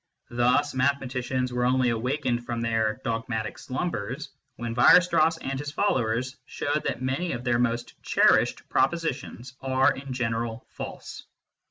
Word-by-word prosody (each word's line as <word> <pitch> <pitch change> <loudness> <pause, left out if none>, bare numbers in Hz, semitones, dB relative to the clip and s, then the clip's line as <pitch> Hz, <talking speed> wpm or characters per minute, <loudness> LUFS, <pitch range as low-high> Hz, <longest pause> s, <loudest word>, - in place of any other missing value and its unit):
Thus 120 +1 +2
mathematicians 130 -1 -1
were 125 0 0
only 125 0 +3
awakened 120 +1 -1
from 120 -1 -3
their 110 -1 0
" - - -32
dog 115 -2 -2
matic 110 -2 -3
slumbers 135 -1 -4
" 135 -2 -49
when 120 -1 -4
Weierstrass 165 +4 +5
and 135 0 -3
his 145 0 -4
followers 130 - 0
showed 150 +1 -2
that - - -2
many 140 +7 -1
of 120 - -5
their 120 -2 +1
most 120 -1 -1
cherished - - +3
propositions 140 -6 -1
are 130 0 +3
in 135 0 -8
general 115 -1 -2
false. - - -8
125 Hz, 150 wpm, -26 LUFS, 120-140 Hz, -, Weierstrass